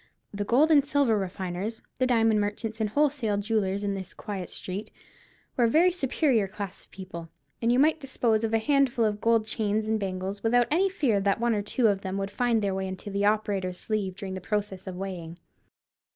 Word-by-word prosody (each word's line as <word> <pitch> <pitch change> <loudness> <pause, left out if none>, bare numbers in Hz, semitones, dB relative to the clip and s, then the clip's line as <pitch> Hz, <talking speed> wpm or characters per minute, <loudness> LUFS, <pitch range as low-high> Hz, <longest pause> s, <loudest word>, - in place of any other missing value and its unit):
The 205 0 -2
gold 275 +10 +3
and 290 -3 +6
silver 280 -5 +2
refiners, 190 +2 -4 0.2
the 255 - +3
diamond 225 -3 +3
merchants 220 +2 -3
and 215 - +1
wholesale 265 -5 +1
jewellers, 200 -2 0
in 200 -1 0
this 190 -1 -7
quiet 195 -4 -5
street, 190 +3 -6 0.7
were 240 - +3
a - - +3
very 340 +8 +5
superior 270 - +1
class 195 -1 -6
of - - -25
people, 170 -4 -9 0.3
and 230 0 +2
you 245 - +3
might 310 +4 +4
dispose 235 -5 0
of 225 - 0
a 225 - +3
handful 260 -1 +2
of 210 -1 -1
gold 230 -1 +3
chains 215 -1 -1
and 220 0 +1
bangles 190 0 -4
without 240 +2 +3
any 375 +5 +3
fear 270 - +1
that 195 +2 +1
one 235 0 +2
or 210 - 0
two 230 +4 0
of 200 -2 +1
them 190 0 -3
would 195 0 -3
find 235 -3 +1
their 200 -1 0
way 190 0 -2
into 190 +2 -7
the 200 +1 0
operator's 200 -4 0
sleeve 205 -4 -2
during 195 -1 -6
the 185 - -5
process 200 -1 -3
of 185 - -5
weighing. 180 -3 -6
210 Hz, 210 wpm, -27 LUFS, 195-235 Hz, 0.7 s, and